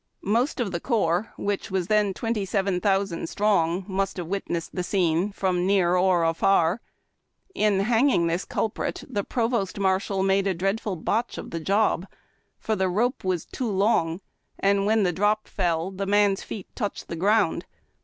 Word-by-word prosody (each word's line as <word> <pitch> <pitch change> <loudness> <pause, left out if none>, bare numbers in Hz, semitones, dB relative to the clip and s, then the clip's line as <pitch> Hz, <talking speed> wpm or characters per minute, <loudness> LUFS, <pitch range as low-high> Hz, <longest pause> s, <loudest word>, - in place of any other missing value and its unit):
Most 235 +10 +1
of 225 -6 -1
the 170 - -2
corps, 195 -1 0
which 200 -1 -2
was 190 -2 -1
then 210 +1 +2
twenty 225 -3 -2
seven 195 -1 0
thousand 195 -4 0
strong, 190 -3 +1
must 195 -1 -2
have 175 - -3
wit 195 +4 -3
nessed 170 -1 -3
the 180 - -2
scene, 180 0 +1
from 185 -2 0
near 185 -3 +3
or 180 -2 +3
afar. 165 +4 +2 0.7
In 210 - +2
hanging 230 -3 +3
the 170 +2 0
cul 220 - 0
prit - - -4
the 205 - -2
provost 230 -5 -1
marshal 190 0 +1
made 195 0 +2
a 190 - 0
dreadful 195 +3 -1
botch 220 +8 -1
of - - -7
the 165 - -3
job, 195 +1 +1 0.5
for 220 - -2
the 190 -2 0
rope 235 +8 0
was 185 -3 -1
too 250 -3 -4
long, 190 -4 +1 0.4
and 200 0 +2
when 220 0 +3
the 180 -2 +1
drop 210 +4 +1
fell 175 -1 -1
the 195 +1 -4
man's 205 -1 +3
feet 200 - -8
touched 205 -5 -4
the - - -5
ground. 200 +1 +2
195 Hz, 175 wpm, -25 LUFS, 180-210 Hz, 0.7 s, near